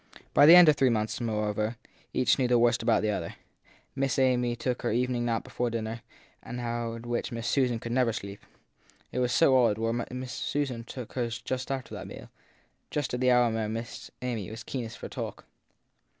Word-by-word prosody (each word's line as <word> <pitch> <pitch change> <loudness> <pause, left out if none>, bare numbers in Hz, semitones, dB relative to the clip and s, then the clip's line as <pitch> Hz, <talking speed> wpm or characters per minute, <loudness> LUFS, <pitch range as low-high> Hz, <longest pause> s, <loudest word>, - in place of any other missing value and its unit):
By 145 - +7
the 165 - +11
end 180 -2 +9
of 155 - +6
three 135 -2 +3
months, 110 0 -1
moreover, 105 0 -1 0.3
each 130 +2 +2
knew 130 - +2
the 120 0 +4
worst 120 0 +3
about 110 -2 +2
the 105 - +1
other. - - -4 0.6
Miss 135 0 0
Amy 125 -2 +2
took 125 +1 -2
her 120 - -1
evening 120 +1 0
nap 115 -1 0
before 120 -1 -2
dinner, 115 0 -4 0.4
an 125 - -7
hour 120 -1 -3
at 115 +1 -9
which 120 +2 -2
Miss 115 0 -4
Susan 125 -4 +2
could 115 +1 -6
never 125 -1 +2
sleep 100 -2 -7 0.7
it - - -2
was 125 -1 +1
so 140 -3 +5
odd; 120 -5 +4
whereby 115 +1 -1
Miss 125 0 -6
Susan 135 -5 -2
took 125 -1 -8
hers 120 -2 -3 0.3
after 135 -2 -4
that - - -6
meal, - - -10 0.6
just 145 -4 -2
at 125 - -1
the 130 0 +3
hour 125 -2 +4
when 110 -1 -2
Miss 115 +1 -6
Amy 115 -7 -3
was 115 +1 -8
keenest 120 -4 -5
for - - -7
talk. - - -6
120 Hz, 200 wpm, -28 LUFS, 115-125 Hz, 0.7 s, the